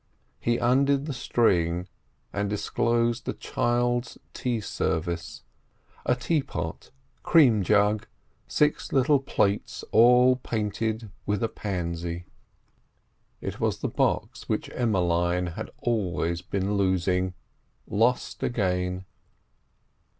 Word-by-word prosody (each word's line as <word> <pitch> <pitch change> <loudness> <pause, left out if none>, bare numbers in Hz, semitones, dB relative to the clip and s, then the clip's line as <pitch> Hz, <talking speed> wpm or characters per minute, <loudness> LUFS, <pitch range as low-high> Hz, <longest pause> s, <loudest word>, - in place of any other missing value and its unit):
He 120 0 +1
undid 140 +3 +2
the 150 - -3
string, 90 -8 +1 0.5
and 100 0 -1
disclosed 115 +3 0
a - - 0
child's 120 0 0 0.2
tea 120 -3 -1
service: 85 -5 -3 0.6
a 125 - +4
teapot, 120 - -2 0.3
cream 130 - +5
jug, 105 +2 +2 0.4
six 150 0 +1
little 140 +2 +4
plates—all 125 +2 +3
painted 110 -2 -2 0.2
with 105 0 0
a 115 - +1
pansy. 85 -3 -4 1.2
It - - -5
was - - 0
the - - 0
box - - -1
which - - -1
Emmeline 90 -5 +1
had - - -5
always 90 -7 -1
been 100 +2 -2
losing—lost 95 +5 -1
again. 90 -4 -1
105 Hz, 95 wpm, -26 LUFS, 90-120 Hz, 1.2 s, cream